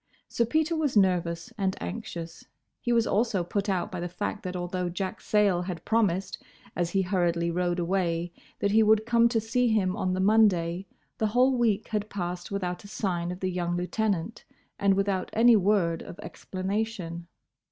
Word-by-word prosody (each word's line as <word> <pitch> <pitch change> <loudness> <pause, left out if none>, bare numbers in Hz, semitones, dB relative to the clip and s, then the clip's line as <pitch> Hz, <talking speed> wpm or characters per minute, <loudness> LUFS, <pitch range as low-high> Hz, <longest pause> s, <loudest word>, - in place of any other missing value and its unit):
Sir 235 - 0
Peter 315 +7 +1
was 295 -7 0
nervous 180 +2 +1
and 190 -1 0
anxious. 165 - -6 0.3
He 240 - -2
was 230 -1 +3
also 205 -4 +1
put 200 +4 -2
out 190 +1 -1
by 185 - -4
the 175 +1 -3
fact 205 +3 -4
that 185 -1 -5
although 180 0 -2
Jack 185 +2 -4
Sayle 205 -4 +2
had 180 -1 -6
promised 195 -4 0 0.3
as 175 -1 0
he 195 +2 +1
hurriedly 175 -2 0
rowed 175 0 0
away, 175 -1 -1 0.2
that 200 - 0
he 220 +2 +5
would 220 0 +4
come 235 0 +4
to 230 -1 +1
see 240 +3 +1
him 195 -5 +1
on 185 -4 -1
the - - -2
Monday, 190 -3 +3 0.3
the 220 - +2
whole 250 +4 +3
week 220 -4 +1
had 210 -1 -2
passed 175 -2 -4
without 185 -2 -3
a - - -11
sign 180 -4 -2
of 180 - -7
the 185 -1 -1
young 175 -1 -1
lieutenant, 195 +2 -2 0.4
and 200 -1 +3
without 195 -1 0
any 235 +1 +6
word 190 -5 +2
of - - -9
explanation. 185 -3 -4
190 Hz, 180 wpm, -27 LUFS, 175-220 Hz, 0.4 s, any